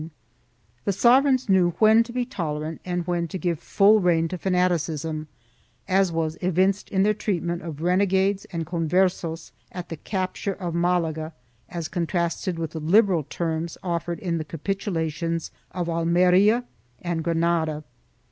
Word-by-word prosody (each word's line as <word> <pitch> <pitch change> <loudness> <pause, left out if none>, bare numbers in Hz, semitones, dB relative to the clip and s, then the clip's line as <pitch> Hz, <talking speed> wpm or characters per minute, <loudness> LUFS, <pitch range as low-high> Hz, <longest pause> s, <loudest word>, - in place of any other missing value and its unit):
1 160 +2 -8 0.7
The 200 - +1
sovereigns 255 +4 +4
knew 185 -3 +3
when 220 +1 +6
to 230 +1 -4
be 245 0 -1
tolerant 160 - -4
and 175 -1 -2
when 175 -1 -1
to 175 - -5
give 175 -4 -1
full 210 +2 +4
rein 170 -3 +2
to 185 - -4
fanaticism, 165 -4 0 0.6
as 190 -1 +3
was 160 -1 -2
evinced 185 +3 +1
in 190 -1 +2
their 210 +1 +3
treatment 175 -5 -2
of 160 -2 -7
renegades 190 +2 +2
and 165 -3 -4
Converses 170 0 0 0.2
at 180 -1 -7
the 165 - -5
capture 190 +2 -3
of 180 -3 -5
Malaga 165 -2 0 0.4
as 170 -2 -4
contrasted 170 0 -2
with 165 -2 -3
the 160 - -5
liberal 175 0 +3
terms 165 +1 -3
offered 170 -1 -2
in 175 -5 -2
the - - -2
capitulations 165 -1 -3 0.2
of 180 -2 -4
Almeria 180 +7 +3 0.4
and 170 -2 -2
Granada. 165 -2 0
175 Hz, 145 wpm, -24 LUFS, 165-190 Hz, 0.7 s, when